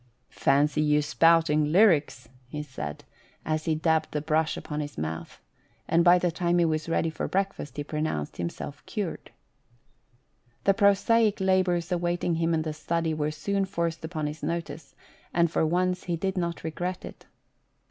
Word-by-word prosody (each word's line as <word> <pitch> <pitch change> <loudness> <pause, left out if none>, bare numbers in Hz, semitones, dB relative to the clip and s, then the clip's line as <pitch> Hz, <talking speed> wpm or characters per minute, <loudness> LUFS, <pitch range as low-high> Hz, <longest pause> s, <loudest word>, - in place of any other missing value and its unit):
" - - -44
Fancy 150 +2 +2
you 150 -1 +3
spouting 155 0 +3
lyrics," 155 - +3 0.2
he 150 +3 -5
said, 75 - -7 0.4
as 155 0 -1
he 160 - +1
dabbed 160 0 +1
the 150 - 0
brush 155 +1 0
upon 150 0 -5
his 145 -1 -5
mouth, 80 +1 -5 0.5
and 170 +1 +3
by 175 +1 +7
the 175 -1 0
time 175 +1 0
he 170 - +4
was 155 0 -1
ready 165 0 +1
for - - -3
breakfast 195 -8 -2
he 145 - -2
pronounced 150 - -3
himself 85 +11 -5
cured. 205 -6 -4 1.3
The 195 - +4
prosaic 205 +2 +3
labours 185 -2 +1
awaiting 175 0 0
him 165 0 +1
in 160 - 0
the 155 -1 -3
study 165 +1 -1
were 150 -1 -1
soon 195 +6 -1
forced 170 -3 -3
upon 160 -2 -3
his 150 +1 -5
notice, 160 -4 -5 0.4
and 170 -1 +3
for - - +1
once 180 +2 0
he 175 - -1
did 190 +3 -2
not 170 -2 -2
regret 180 +3 -4
it. - - -12
165 Hz, 170 wpm, -27 LUFS, 150-175 Hz, 1.3 s, by